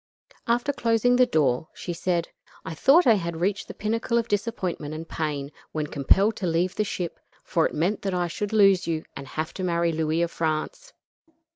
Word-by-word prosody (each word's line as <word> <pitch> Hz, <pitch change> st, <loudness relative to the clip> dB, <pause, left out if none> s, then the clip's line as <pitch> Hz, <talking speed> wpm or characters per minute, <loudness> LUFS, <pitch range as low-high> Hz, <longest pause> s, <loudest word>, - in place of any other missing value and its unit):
After 240 Hz, +4 st, +1 dB
closing 235 Hz, -1 st, +2 dB
the 250 Hz, 0 st, +5 dB
door 145 Hz, -, +1 dB
she 175 Hz, -, -5 dB
said: 170 Hz, 0 st, -1 dB, 0.4 s
"I 165 Hz, -, -4 dB
thought 285 Hz, -, +5 dB
I 235 Hz, -, +7 dB
had 170 Hz, -5 st, -2 dB
reached 195 Hz, +3 st, -1 dB
the -, -, -8 dB
pinnacle 230 Hz, +2 st, -1 dB
of 230 Hz, -1 st, 0 dB
disappointment 195 Hz, -8 st, -2 dB
and 165 Hz, +1 st, -7 dB
pain 145 Hz, -3 st, -3 dB, 0.2 s
when 155 Hz, -1 st, -1 dB
compelled 190 Hz, +10 st, +2 dB
to 185 Hz, -, -2 dB
leave 175 Hz, +2 st, +1 dB
the 215 Hz, -, 0 dB
ship, 180 Hz, -4 st, -4 dB, 0.2 s
for 165 Hz, -, +1 dB
it -, -, -9 dB
meant 175 Hz, +7 st, 0 dB
that 195 Hz, -2 st, -2 dB
I 175 Hz, -1 st, +1 dB
should 200 Hz, +4 st, -4 dB
lose 195 Hz, -4 st, +4 dB
you 160 Hz, -2 st, -2 dB
and 140 Hz, -, -8 dB
have 155 Hz, +4 st, -4 dB
to 185 Hz, -, -5 dB
marry 170 Hz, -1 st, +1 dB
Louis 160 Hz, +1 st, 0 dB
of 170 Hz, -, -2 dB
France. 170 Hz, -, -3 dB
175 Hz, 195 wpm, -25 LUFS, 160-215 Hz, 0.4 s, I